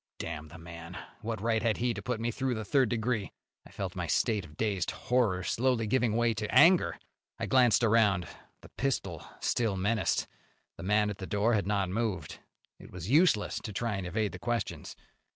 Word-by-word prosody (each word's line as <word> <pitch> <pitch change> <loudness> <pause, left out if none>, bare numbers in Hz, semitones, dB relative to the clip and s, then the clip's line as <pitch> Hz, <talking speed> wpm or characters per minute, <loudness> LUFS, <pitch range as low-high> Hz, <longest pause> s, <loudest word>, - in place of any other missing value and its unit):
Damn 80 -1 -5
the 80 +2 -12
man! 85 0 -9 0.2
What 110 -2 -4
right 115 0 +1
had 110 -1 +1
he 120 0 0
to - - -6
put 125 -3 -2
me 115 +1 -1
through 130 +1 -1
the 110 -1 -4
third 130 0 +3
degree? 115 -2 -1 0.4
I - - -18
felt - - -5
my - - -3
state 105 -3 +1
of 75 -1 -16
dazed 100 -5 0
horror 115 -7 0
slowly 120 +2 +1
giving 115 -1 +1
way 120 0 +2
to 105 -1 -4
anger. 180 +1 +5 0.4
I - - -2
glanced 125 -3 +4
around. 105 -5 +3 0.3
The - - -14
pistol 135 0 -2 0.2
still 110 -5 0
menaced; 110 +4 +1 0.5
the - - -10
man 105 +2 +2
at 100 - -8
the 95 - -6
door 105 +3 +1
had 100 -3 +1
not 100 -2 +1
moved. 110 -1 -2 0.4
It - - -12
was 90 +4 -6
useless 150 - +3
to 105 - -7
try 110 +1 -2
and 95 -2 -4
evade 105 +3 -1
the - - -9
questions. 120 -3 -3
110 Hz, 195 wpm, -30 LUFS, 100-120 Hz, 0.5 s, anger